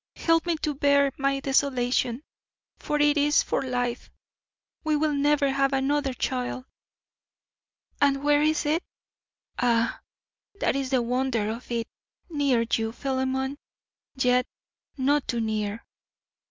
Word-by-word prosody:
Help 330 0 +2
me 340 - +2
to 305 -1 -2
bear 280 0 +3
my 275 0 0
desolation, 260 -2 0 0.6
for 295 - -2
it 295 0 +4
is 295 +1 +4
for - - -1
life. 245 -2 -2 0.7
We 310 -1 +1
will 300 0 +1
never 285 0 +2
have 275 0 +1
another 270 0 0
child. 255 0 -3 1.4
And 280 -1 +3
where 290 0 +4
is 310 0 +1
it? 315 +4 +1 0.8
Ah, 235 -2 +1 0.6
that - - +1
is 270 -1 -2
the 255 -3 +2
wonder 240 -3 0
of 230 +3 -8
it. 235 -1 -2 0.4
Near 275 -6 +2
you, 225 0 +1
Philemon, 265 +1 -2 0.6
yet 250 -1 +2 0.5
not 280 +1 +1
too 240 - -1
near. 215 -1 -2
270 Hz, 125 wpm, -26 LUFS, 245-290 Hz, 1.4 s, it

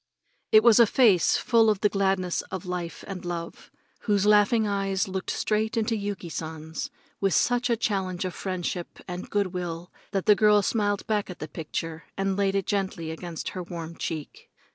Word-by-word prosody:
It 215 0 +7
was 235 -1 +7
a 235 - +7
face 205 -8 +4
full 230 -2 +4
of 210 -2 +1
the 210 - +5
gladness 190 -3 0
of 190 -2 -5
life 180 -2 -4
and 190 -2 -6
love, 170 -1 -6 0.3
whose 205 -2 +1
laughing 210 +2 +4
eyes 195 -2 0
looked 190 0 -4
straight 220 +1 0
into 225 +1 +1
Yuki 200 -3 -4
San's 160 0 -5 0.3
with 195 -3 +2
such 245 0 +2
a 235 - +2
challenge 190 -4 -1
of 185 - -3
friendship 180 -2 -4
and 180 0 -6
good 200 -3 0
will 175 -1 -5 0.2
that 195 -2 -2
the 210 - +7
girl 210 0 +4
smiled 205 -1 0
back 210 -3 -1
at 180 - -7
the 155 - -6
picture 165 +1 -5
and 195 0 0
laid 195 0 +1
it 195 -2 0
gently 190 -5 -2
against 165 0 -5
her 185 - -5
warm 170 -2 -7
cheek. 155 -3 -6
195 Hz, 185 wpm, -26 LUFS, 175-210 Hz, 0.3 s, It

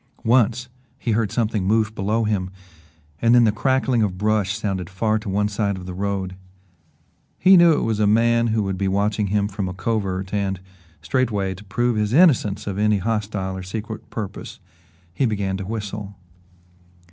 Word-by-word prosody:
Once 120 +1 +2 0.3
he 120 - -2
heard 110 -2 0
something 110 -4 0
move 110 +2 +1
below 110 +2 0
him 100 -4 -1 0.7
and 115 +1 +5
then 120 - +6
the 110 - +4
crackling 130 +2 +1
of 95 -4 -1
brush 105 0 0
sounded 95 -5 -3
far 110 +3 0
to 105 -1 -7
one 105 +2 +1
side 100 -1 -1
of 90 - -9
the 90 - -6
road. 95 -1 -3 1.0
He 190 +3 +6
knew 170 -2 +7
it - - 0
was 110 -2 -1
a 105 - +3
man 115 +2 +3
who 110 -1 +1
would 95 -1 -3
be 100 - 0
watching 100 +2 0
him 100 +1 +1
from 100 -2 -4
a 90 - -7
covert 95 -2 -2
and, 100 -2 -1 0.4
straightway, 100 -1 0
to 95 +3 -12
prove 120 +3 0
his 105 +1 0
innocence 135 - +4
of 100 -1 -4
any 105 0 +3
hostile 100 -2 -2
or 95 - -5
secret 110 +4 -7
purpose, 105 -3 -7 0.5
he 130 - +1
began 100 -3 -1
to 95 -1 -6
whistle. 105 -2 -5
105 Hz, 180 wpm, -22 LUFS, 95-115 Hz, 1.0 s, knew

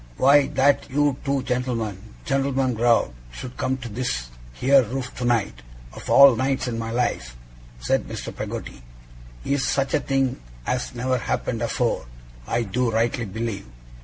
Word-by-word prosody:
'Why, 140 +1 +5
that 140 +1 +3
you 145 0 +1
two 140 -2 0
gent'lmen 125 -5 -2 0.3
gent'lmen 135 -1 +1
growed 115 - +2 0.2
should 125 - -8
come 130 0 -1
to 125 -2 -7
this 115 - -3 0.2
here 135 - +4
roof 125 +2 -4
tonight, 120 - 0 0.3
of - - -9
all 140 -3 +8
nights 130 +2 0
in 115 -2 -3
my 115 0 -3
life,' 90 - -2 0.4
said - - 0
Mr. - - -6
Peggotty, - - -6 0.6
'is 140 -1 +1
such 135 -1 0
a 150 - +4
thing 135 - 0 0.2
as 125 0 -2
never 130 +1 0
happened - - -2
afore, - - -1 0.4
I 120 - 0
do 115 +4 0
rightly 115 +1 0
believe! 105 - -4
125 Hz, 150 wpm, -24 LUFS, 115-135 Hz, 0.6 s, all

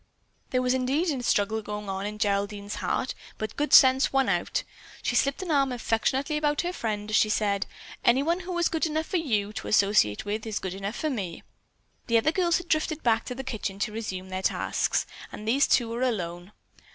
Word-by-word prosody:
There 255 -1 +1
was 250 0 +2
indeed 270 +7 +1
a 265 -3 -2
struggle 220 -1 +1
going 210 0 -6
on 195 +1 -3
in 210 0 -6
Geraldine's 205 -1 -1
heart, 255 - -1 0.2
but 215 -1 -4
good 295 +1 -1
sense 260 0 +7
won 270 -1 +2
out. - - 0 0.4
She - - 0
slipped 275 +7 +1
an 355 - -3
arm 275 -3 +3
affectionately 260 +5 0
about 295 -1 +1
her 355 +1 -3
friend 210 -7 -3
as - - +2
she 215 - +4
said: 200 -2 0 0.4
"Anyone 285 +9 +3
who 365 -1 -4
is 345 - +3
good 325 0 0
enough 315 +1 -1
for 370 - -1
you 215 -10 0
to - - -6
associate 200 - +3
with 215 +2 -3
is 215 - -2
good 190 -1 -4
enough 195 +3 -4
for 310 - -1
me!" 190 -9 -4 0.6
The 230 -2 +4
other 265 +8 +3
girls 345 -1 +2
had 355 - -7
drifted 310 -1 0
back 230 -1 +2
to 250 - -5
the 265 - -5
kitchen 210 -6 -4
to 200 +2 -2
resume 190 -4 -5
their 185 0 -3
tasks, - - 0 0.3
and 215 - -8
these 270 +6 +4
two 240 - +3
were 235 +2 -4
alone. 180 -7 -2
230 Hz, 210 wpm, -27 LUFS, 205-290 Hz, 0.6 s, sense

